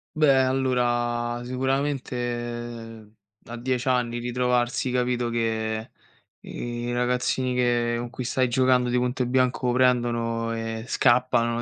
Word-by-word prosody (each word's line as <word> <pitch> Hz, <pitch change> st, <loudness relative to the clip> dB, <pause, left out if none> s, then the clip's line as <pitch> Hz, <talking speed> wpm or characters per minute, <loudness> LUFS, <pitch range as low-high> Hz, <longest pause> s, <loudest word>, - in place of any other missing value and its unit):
Beh 140 Hz, -4 st, +4 dB
allora, 120 Hz, -2 st, 0 dB
sicuramente 120 Hz, -4 st, -3 dB, 0.3 s
a 120 Hz, -, -7 dB
10 125 Hz, +1 st, -2 dB
anni 120 Hz, -2 st, +1 dB
ritrovarsi, 125 Hz, +1 st, 0 dB
capito, 125 Hz, -1 st, 0 dB
che 110 Hz, -1 st, -2 dB, 0.5 s
i 120 Hz, 0 st, -5 dB
ragazzini 125 Hz, +1 st, 0 dB
che 120 Hz, -1 st, +1 dB
con 120 Hz, 0 st, -5 dB
cui 130 Hz, 0 st, -5 dB
stai 130 Hz, +1 st, +1 dB
giocando 125 Hz, 0 st, +3 dB
di 125 Hz, -, +1 dB
punto 125 Hz, +1 st, 0 dB
e -, -, -1 dB
bianco 125 Hz, 0 st, +1 dB
prendono 120 Hz, -2 st, +1 dB
e 115 Hz, 0 st, -4 dB
scappano 120 Hz, -2 st, +2 dB
120 Hz, 120 wpm, -25 LUFS, 120-125 Hz, 0.5 s, Beh